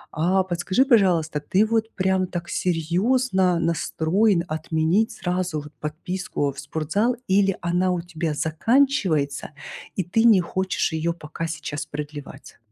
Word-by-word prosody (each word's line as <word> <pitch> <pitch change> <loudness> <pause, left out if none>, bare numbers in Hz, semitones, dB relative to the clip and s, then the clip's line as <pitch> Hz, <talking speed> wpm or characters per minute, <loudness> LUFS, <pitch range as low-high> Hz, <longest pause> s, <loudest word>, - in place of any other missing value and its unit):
А 185 +5 +2
подскажи, 185 +7 +1
пожалуйста, 180 - +3
ты 190 +8 +2
вот 225 0 0
прям 190 -1 +1
так 175 -1 -5
серьезно 185 +3 +1
настроен 170 +3 +1
отменить 160 +6 0
сразу 180 -3 -2
вот 150 +1 -12
подписку 155 -1 -3
в 140 - -10
спортзал 160 - -1
или 195 0 +3
она 180 +2 +1
у 180 - 0
тебя 165 -2 -3
заканчивается, 160 - +1 0.4
и 190 - 0
ты 200 +7 +1
не 220 -5 +7
хочешь 185 +2 -1
её 160 +1 -1
пока 165 0 -6
сейчас 155 -2 -5
продлевать? 145 -2 -8
175 Hz, 130 wpm, -23 LUFS, 160-190 Hz, 0.4 s, не